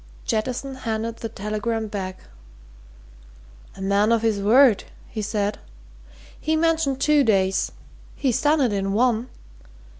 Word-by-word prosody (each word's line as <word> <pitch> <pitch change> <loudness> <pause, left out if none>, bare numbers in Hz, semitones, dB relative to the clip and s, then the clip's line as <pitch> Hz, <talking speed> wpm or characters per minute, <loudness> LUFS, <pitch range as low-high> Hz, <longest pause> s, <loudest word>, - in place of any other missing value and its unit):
Jettison 250 +5 -2
handed 230 -2 -3
the 225 - -5
telegram 215 +2 -3
back. 190 -3 -5 1.5
"A - - -10
man 200 +3 +2
of 230 -1 +2
his 220 -3 +1
word!" 230 +2 +5 0.2
he 215 - -5
said. 205 0 -2 0.8
"He 315 +1 0
mentioned 320 -4 +1
two 300 0 +4
days 195 -4 +2 0.4
he's 260 -5 0
done 300 +1 +3
it 245 -5 +2
in 195 0 -1
one! 240 +2 +1
225 Hz, 125 wpm, -23 LUFS, 205-260 Hz, 1.5 s, word